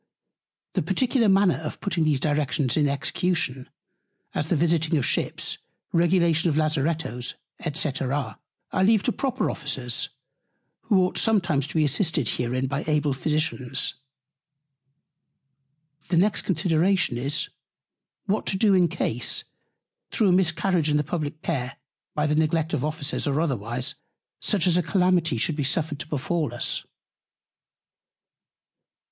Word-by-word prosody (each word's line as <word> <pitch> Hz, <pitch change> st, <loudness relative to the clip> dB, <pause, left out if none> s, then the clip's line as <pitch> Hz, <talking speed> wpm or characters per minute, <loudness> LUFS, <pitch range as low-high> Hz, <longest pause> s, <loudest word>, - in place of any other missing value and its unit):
The -, -, +1 dB
particular 245 Hz, -4 st, +2 dB
Manner 195 Hz, -2 st, +4 dB
of 155 Hz, -1 st, -6 dB
putting 170 Hz, -5 st, 0 dB
these 150 Hz, -3 st, +2 dB
Directions 145 Hz, -3 st, 0 dB
in 150 Hz, -2 st, +3 dB
Execution, 140 Hz, -2 st, -1 dB, 0.6 s
as 150 Hz, -, -2 dB
the 170 Hz, -, +1 dB
Visiting 165 Hz, 0 st, +2 dB
of 135 Hz, -, 0 dB
Ships, -, -, -1 dB, 0.3 s
Regulation 170 Hz, -1 st, +3 dB
of 150 Hz, -, 0 dB
Lazarettos, 155 Hz, -5 st, -1 dB, 0.4 s
&c. 155 Hz, -, +1 dB, 0.8 s
I -, -, 0 dB
leave 215 Hz, 0 st, +4 dB
to 245 Hz, -, +1 dB
proper 265 Hz, -1 st, -1 dB
Officers, 130 Hz, -6 st, -2 dB, 0.8 s
who 200 Hz, -5 st, +4 dB
ought 180 Hz, -, 0 dB
sometimes 175 Hz, -11 st, +2 dB
to -, -, -11 dB
be 155 Hz, -1 st, +4 dB
assisted 150 Hz, -, +1 dB
herein 125 Hz, +2 st, -1 dB
by 140 Hz, +2 st, -2 dB
able 150 Hz, -2 st, +1 dB
Physicians. 140 Hz, -2 st, -1 dB, 2.1 s
The 175 Hz, -, +1 dB
next 200 Hz, +4 st, +3 dB
Consideration 175 Hz, -4 st, +2 dB
is, 140 Hz, +5 st, -1 dB, 0.8 s
What 210 Hz, +1 st, -1 dB
to 190 Hz, -, +1 dB
do 205 Hz, 0 st, +4 dB
in 180 Hz, -2 st, +5 dB
Case, 125 Hz, -8 st, -1 dB, 0.7 s
through 210 Hz, -4 st, +2 dB
a -, -, +5 dB
Miscarriage 175 Hz, -2 st, +2 dB
in 150 Hz, -, +3 dB
the 150 Hz, -, +1 dB
publick 155 Hz, 0 st, -4 dB
Care, 135 Hz, -6 st, -2 dB, 0.4 s
by 150 Hz, -, +1 dB
the 150 Hz, -, +1 dB
Neglect 160 Hz, +1 st, +1 dB
of -, -, 0 dB
Officers, 150 Hz, -2 st, -2 dB
or 140 Hz, +1 st, +1 dB
otherwise, 125 Hz, -5 st, -2 dB, 0.5 s
such 195 Hz, -4 st, +1 dB
a 180 Hz, -1 st, +4 dB
Calamity 180 Hz, -, +2 dB
should 150 Hz, +7 st, 0 dB
be 145 Hz, -, -1 dB
suffered 150 Hz, +2 st, -1 dB
to -, -, -6 dB
befall 150 Hz, -2 st, -2 dB
us. -, -, -2 dB
155 Hz, 135 wpm, -25 LUFS, 145-180 Hz, 2.1 s, in